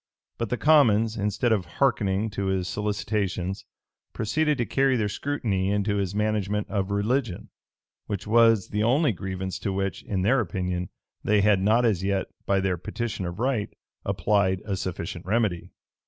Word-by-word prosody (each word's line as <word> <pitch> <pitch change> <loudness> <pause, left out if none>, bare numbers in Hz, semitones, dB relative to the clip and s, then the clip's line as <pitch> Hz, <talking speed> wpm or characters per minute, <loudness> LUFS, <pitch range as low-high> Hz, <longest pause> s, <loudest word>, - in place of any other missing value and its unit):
But 115 - -2
the 125 - -1
commons, 115 -8 +4
instead 105 +4 0
of 100 -5 +1
hearkening 110 -5 +1
to 100 -1 -2
his 95 -1 0
solicitations 100 -2 -2 0.5
proceeded 150 +7 0
to 120 - 0
carry 135 0 +2
their 105 -2 0
scrutiny 105 -5 -1
into 100 0 0
his 100 -1 -2
management 105 -1 0
of 100 -1 -1
religion,[] 105 +1 -1 0.6
which 100 -2 -4
was 115 -2 +4
the 105 - -1
only 130 +6 +3
grievance 95 -1 -4
to 100 - -2
which, 95 0 -2
in 95 -3 -2
their 130 +7 +3
opinion, 90 -3 -2 0.3
they 105 -1 +3
had 100 -2 +4
not 110 +5 +3
as 100 -5 +1
yet, 95 -1 0 0.2
by 100 0 +3
their 95 -2 0
petition 105 0 -4
of 85 +1 -6
right, 120 -3 0 0.3
applied 95 0 +1
a 100 -2 -1
sufficient 85 -2 -5
remedy. 100 -3 0
105 Hz, 160 wpm, -26 LUFS, 95-115 Hz, 0.6 s, commons